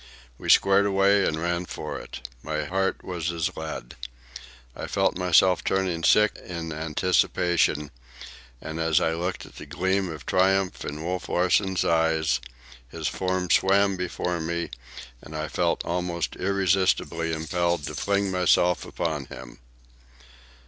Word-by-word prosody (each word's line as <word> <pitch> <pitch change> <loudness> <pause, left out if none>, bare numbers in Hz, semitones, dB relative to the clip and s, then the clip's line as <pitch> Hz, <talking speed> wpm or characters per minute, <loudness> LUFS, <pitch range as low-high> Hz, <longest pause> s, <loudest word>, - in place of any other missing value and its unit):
We - - -6
squared 100 +1 +5
away 100 0 +3
and 80 - -1
ran 85 +1 -1
for - - -5
it. - - -9
My 75 +1 -3
heart 95 +4 -1
was 85 -2 -3
as 85 -2 -2
lead. 80 -6 -6 0.8
I - - -6
felt - - +1
myself 90 0 +4
turning 95 -3 0
sick 105 +3 +4
in 85 -2 -5
anticipation; 80 -1 +1 0.7
and 80 +4 -6
as 80 -1 +3
I 80 - +1
looked 90 +2 -3
at - - -15
the - - -9
gleam 95 +1 0
of 80 -3 -8
triumph 95 0 +1
in 75 +2 -5
Wolf 90 +2 -3
Larsen's 95 +1 +2
eyes, 80 -3 +2 0.5
his - - -4
form 95 -1 -1
swam 100 +1 +4
before 90 -1 -3
me, 85 +1 -3 0.5
and 80 - -10
I 75 0 -3
felt 85 +2 0
almost 85 -1 -2
irresistibly 95 -3 +1
impelled 85 +1 -1
to - - -5
fling 100 -1 0
myself 90 -1 +2
upon 75 -4 -3
him. 65 -2 -11
90 Hz, 140 wpm, -25 LUFS, 80-95 Hz, 0.8 s, squared